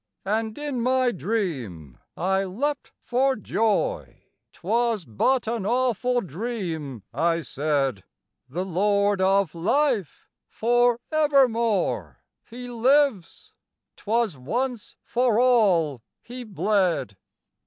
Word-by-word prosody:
And 220 +2 -1
in 290 -4 -3
my 255 0 +2
dream 140 - -4 0.2
I 190 +2 +1
leapt 270 +10 -3
for 265 +2 +1
joy 225 - -1 0.3
"'Twas 230 -5 -1
but 240 - +1
an 230 -2 -2
awful 245 +2 +1
dream," 165 - -5
I 165 0 +1
said, 140 - -1 0.4
"The 175 +8 -4
Lord 200 +2 +1
of 195 -3 +2
Life, 210 - 0 0.2
for 240 +1 +2
evermore 255 - +1 0.3
He 245 +1 -8
lives 245 - +1 0.4
'twas 220 -4 -1
once 235 - -3
for 240 -2 +1
all 190 - +3 0.2
He 245 +1 -8
bled!" 190 - 0
220 Hz, 100 wpm, -24 LUFS, 175-245 Hz, 0.4 s, all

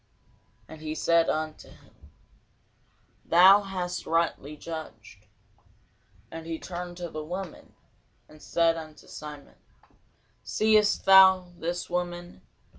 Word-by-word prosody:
And 160 -1 -12
he 155 0 -5
said 170 0 +2
unto 155 0 -4
him, - - -21 1.1
Thou 190 +4 +7
hast 180 -2 -5
rightly 160 -3 -1
judged. 115 -11 -9 1.0
And 165 0 -8
he 165 -1 -4
turned 175 0 -7
to 175 -1 -6
the 155 0 -6
woman, 180 +2 -8 0.5
and 155 0 -18
said 165 -1 +1
unto 155 -1 -11
Simon, 150 -1 -11 0.9
Seest 215 -1 +2
thou 190 -2 +7
this 175 +1 -4
woman? 175 - -5
170 Hz, 110 wpm, -27 LUFS, 155-180 Hz, 1.1 s, Thou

